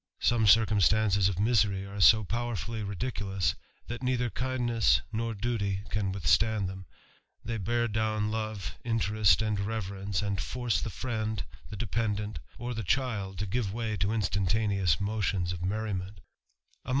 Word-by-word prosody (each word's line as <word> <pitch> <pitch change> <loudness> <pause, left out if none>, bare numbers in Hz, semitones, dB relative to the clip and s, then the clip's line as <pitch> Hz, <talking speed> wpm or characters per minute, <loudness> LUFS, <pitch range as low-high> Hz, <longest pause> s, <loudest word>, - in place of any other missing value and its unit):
Some 115 -3 +3
circumstances 105 -2 +4
of 95 - -4
misery 100 -2 +2
are 100 +1 -6
so 110 +3 +7
powerfiil^ 115 -1 -3
ridiculous, 95 - -1 0.3
that 120 +1 -6
neither 125 -2 0
kindness 120 - +2
nor 115 0 -1
duty 100 -3 -1
can 100 -2 0
withstand 100 +4 +2
them; 95 -1 -8 0.6
they 115 0 -2
bear 120 +4 0
down 110 -1 0
love, 110 -4 -4
interest, 110 -5 +3
and 105 -2 0
reverence^ 100 -2 -2
and 100 -1 -1
force 120 -2 -1
the - - -3
friend, 110 -5 -3 0.3
the 105 - -7
dependent, 105 -4 -2 0.2
or 120 +1 -4
the 115 - -3
child, 100 -2 -1
to 100 - -2
give 100 0 -1
way 115 -2 -2
to 100 +3 0
instantaneous 100 -4 +1
motions 100 -4 -1
of 90 - -6
merriment 100 0 -2
THE 60 -8 -28
RAMBLER. - - -5
105 Hz, 150 wpm, -29 LUFS, 95-115 Hz, 0.6 s, so